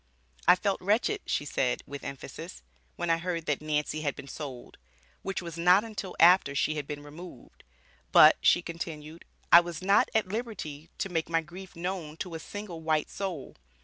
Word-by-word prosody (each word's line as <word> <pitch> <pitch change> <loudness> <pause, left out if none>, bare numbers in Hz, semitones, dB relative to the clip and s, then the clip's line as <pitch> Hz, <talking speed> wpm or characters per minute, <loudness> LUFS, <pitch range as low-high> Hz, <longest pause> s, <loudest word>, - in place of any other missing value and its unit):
"I - - +9
felt 195 +1 -1
wretched," 225 - +1
she 145 - -1
said, 125 -3 -1
with 140 -1 -8
emphasis, 65 - -8 0.3
"when 175 - -1
I 165 - +2
heard 170 -2 -3
that 150 -1 -1
Nancy 155 0 -1
had 145 -3 -1
been 140 - -10
sold," 135 -4 -8 0.4
which 195 -1 -4
was 170 -1 -7
not 180 +4 +5
until 210 -5 -6
after 170 -4 +6
she 155 - +1
had 150 -2 -4
been 145 -1 -6
removed. 150 -2 -12 0.5
"But," - - +8
she 175 - +4
continued, 165 -1 -7 0.3
"I 170 - +11
was 175 0 -5
not 200 +2 +4
at 220 -4 +2
liberty 185 -9 -5
to 195 - -2
make 165 -2 -2
my 165 0 +2
grief 180 +3 -11
known 170 -3 -4
to 180 -1 -5
a 165 - -4
single 190 -2 -7
white 155 -1 0
soul. 185 -8 -5
165 Hz, 180 wpm, -29 LUFS, 150-185 Hz, 0.5 s, I